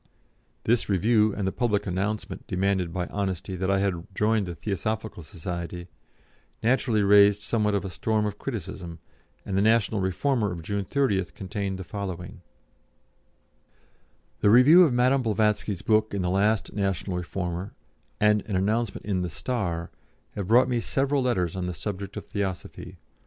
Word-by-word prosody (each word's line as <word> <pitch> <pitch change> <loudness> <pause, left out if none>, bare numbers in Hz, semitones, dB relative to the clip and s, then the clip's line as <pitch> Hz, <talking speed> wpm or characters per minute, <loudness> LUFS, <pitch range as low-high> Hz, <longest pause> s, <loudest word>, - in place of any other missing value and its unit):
This 115 -1 +1
review, 105 +3 +3
and 100 -1 -2
the - - 0
public 105 -3 0
announcement, 100 +3 -3
demanded 95 -2 0
by 90 0 -2
honesty, 95 -2 -3
that 95 +1 -1
I 100 - +3
had 95 -3 -1
joined 105 -1 +1
the 85 - -5
Theosophical 105 +3 -3
Society, 85 +1 -6 0.7
naturally 115 -2 +2
raised 100 0 +6
somewhat 105 -3 +1
of 100 - -1
a - - -3
storm 110 +4 0
of 105 -1 -4
criticism, 95 -8 -6 0.5
and 95 - -3
the 95 - +3
National 110 -1 +3
Reformer 105 +3 0
of 85 -2 -6
June 100 +2 -2
30th 100 -8 0
contained 95 0 -4
the 95 - -6
following: 90 -2 -6 2.0
"The 105 - +4
review 145 - +8
of 150 - +1
Madame 125 +2 +3
Blavatsky's 105 -4 0
book 110 -1 +2
in 95 - -1
the 90 - 0
last 105 +2 +1
National 95 -2 -1
Reformer, 90 +1 -4 0.4
and 105 0 +4
an 100 - -2
announcement 105 +4 0
in 95 -3 0
the 90 - -2
Star, 85 -5 -3 0.4
have 100 -3 -5
brought 120 +4 +5
me 125 -2 0
several 135 +4 0
letters 95 -10 0
on 90 -1 -2
the 90 - -4
subject 100 0 -5
of - - -6
Theosophy. 95 -3 -5
100 Hz, 155 wpm, -26 LUFS, 95-110 Hz, 2.0 s, review